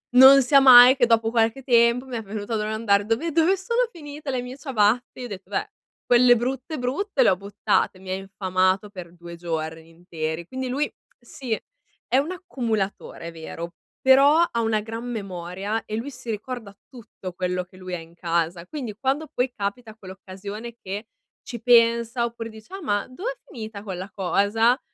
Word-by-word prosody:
Non 270 +2 +9
sia 275 +3 +6
mai 255 -1 +10
che 255 -3 +3
dopo 225 -1 +3
qualche 230 +2 +1
tempo 235 0 +3
mi 245 - -4
è 225 - -5
venuto 210 +2 -5
a - - +2
domandare: 210 -1 +1
"Dove 235 +10 -1
dove 330 +5 +3
sono 470 +5 0
finite 295 -5 -7
le 255 -1 -1
mie 250 +2 -8
ciabatte?" 245 -3 0
Gli - - -5
ho - - -5
detto: 195 -4 -9
"Beh, - - -2 0.4
quelle 245 0 +6
brutte, 260 +5 -3
brutte 270 +5 0
le - - +5
ho - - +2
buttate". 200 -1 -1
Mi 185 0 -8
ha - - 0
infamato 190 0 0
per 180 -4 -10
2 170 0 -10
giorni 160 -1 -5
interi. 165 -1 -5
Quindi 260 +2 -4
lui 285 +4 0 0.3
sì, 245 +1 -9 0.6
è 255 - +2
un 295 +6 +1
accumulatore, 235 - -4
è 170 - -6
vero, 165 +1 -7 0.3
però 275 +4 +6 0.2
una 225 -1 +1
gran 225 +2 -6
memoria 195 -1 -4
e 215 - -4
lui 240 +5 -4
si 250 -2 -10
ricorda 220 -1 -6 0.2
tutto 210 -7 -10
quello 180 0 -2
che 185 - -21
lui 185 -1 -8
ha - - -5
in 165 +1 -14
casa. 170 0 -1
Quindi 245 -7 -6
quando 275 +5 0
poi 250 +1 0
capita 215 +2 -4
quell'occasione 200 +3 -9
che 200 +4 -6 0.4
ci 235 -3 -7
pensa, 235 0 +4
oppure 235 -1 -6
dice: 220 - -14
"Ah 390 - -6
ma, 205 -7 0
dov'è 445 - -5
finita 220 -4 -8
quella 190 -1 -6
cosa?" 210 +6 +2
225 Hz, 180 wpm, -24 LUFS, 190-255 Hz, 0.6 s, mai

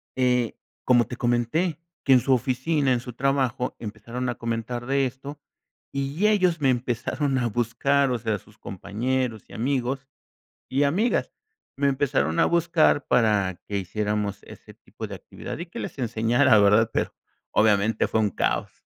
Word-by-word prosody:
eh, 125 -3 +1 0.3
como 120 -3 +4
te 125 - -6
comenté, 120 +8 0 0.2
que 135 - +5
en 130 - +7
su 135 +2 +2
oficina, 130 +3 +1
en 120 - +1
su 125 0 -8
trabajo, 130 -1 0
empezaron 115 +3 -5
a 120 - -2
comentar 115 +1 -4
de 135 0 +2
esto 140 +3 -9 0.5
y 140 +9 0
ellos 185 -7 +2
me 135 - +3
empezaron 130 +3 -1
a 120 - 0
buscar, 125 +4 +1
o 120 - -1
sea, 110 -2 -1
sus 105 +3 -22
compañeros 115 +4 -3
y - - -15
amigos 130 +2 -1 0.6
y 140 +2 +1
amigas 195 +12 +1 0.5
me 140 - +2
empezaron 135 - +1
a - - +5
buscar 170 -4 +2
para 100 -6 +2
que 100 -1 -1
hiciéramos 105 +1 -2
ese - - -13
tipo - - -9
de - - -7
actividad - - -8
y 170 - -5
que 210 +8 -9
les 160 - -6
enseñara, 115 0 +3
¿verdad? 105 +3 +4
Pero, - - -1 0.4
obviamente, 105 0 +3
fue 110 - 0
un 105 -2 +1
caos. - - -1
125 Hz, 160 wpm, -25 LUFS, 110-140 Hz, 0.6 s, en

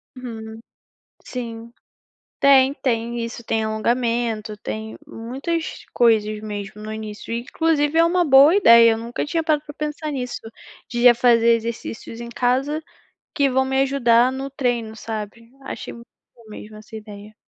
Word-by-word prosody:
Hum, 225 -3 -8 0.6
sim. 230 -2 -7 0.7
Tem, 275 -1 +5
tem 235 -3 -2
isso, 230 +1 -6
tem 220 0 -1
alongamento, 225 -1 -1
tem 220 +1 -6
muitas 275 +9 -5
coisas 215 -3 +2
mesmo 210 -1 -7
no 215 - -6
início, 215 0 -7
e 235 - -1
inclusive 310 +2 0
é 330 - +6
uma 350 +1 +2
boa 280 +2 +7
ideia, 230 - +7
eu 225 - 0
nunca 235 +1 -4
tinha 325 +3 -1
parado 305 -2 +1
para 295 - -9
pensar 300 +1 -4
nisso. 250 -3 -4 0.5
De 240 -2 -3
já 245 -1 +7
fazer 235 -1 +4
exercícios 230 0 -6
em 235 - -7
casa, 260 +6 0 0.5
que 280 -5 +2
vão 265 +1 +1
me 265 0 +1
ajudar 250 -2 +3
no 270 +1 -5
treino, 240 -5 -2
sabe? 220 +1 -7
Achei - - -7
muito 235 0 -13 0.3
boa 235 -2 -20
mesmo 215 0 -10
essa 215 +1 -12
ideia. 210 -1 -10
235 Hz, 155 wpm, -21 LUFS, 220-270 Hz, 0.7 s, boa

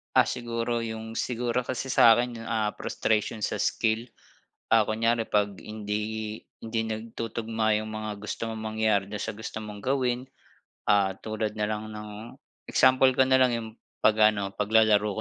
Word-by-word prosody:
Ah, - - +7
siguro 120 0 -2
yung 110 0 -5
siguro 120 0 -1
kasi 130 +1 -3
sa'kin 120 0 +5
yung, - - -9
ah, 110 -2 0
frustration 110 0 -1
sa - - -1
skill. 110 +2 0 0.6
Ah, 110 -1 +5
kunyari, 115 +1 +1
'pag 105 -2 0
hindi 105 0 -4 0.2
hindi 115 0 -2
nagtutugma 110 0 -2
yung 110 0 -6
mga 110 0 -4
gusto 115 +2 -4
mong 110 -1 -6
mangyari 110 -2 +2
dun 105 - -4
sa - - -2
gusto 110 +1 -7
mong 105 -1 -8
gawin, 125 0 0 0.6
ah, 100 -2 +4
tulad 110 -1 -3
nalang 105 0 -3
ng 105 0 -7 0.6
example 130 0 +5
ko 130 - +5
nalang 130 -1 +5
yung 115 -1 -3 0.3
pag-ano, 105 -2 +4
paglalaro 105 -1 +3
110 Hz, 145 wpm, -27 LUFS, 105-115 Hz, 0.6 s, Ah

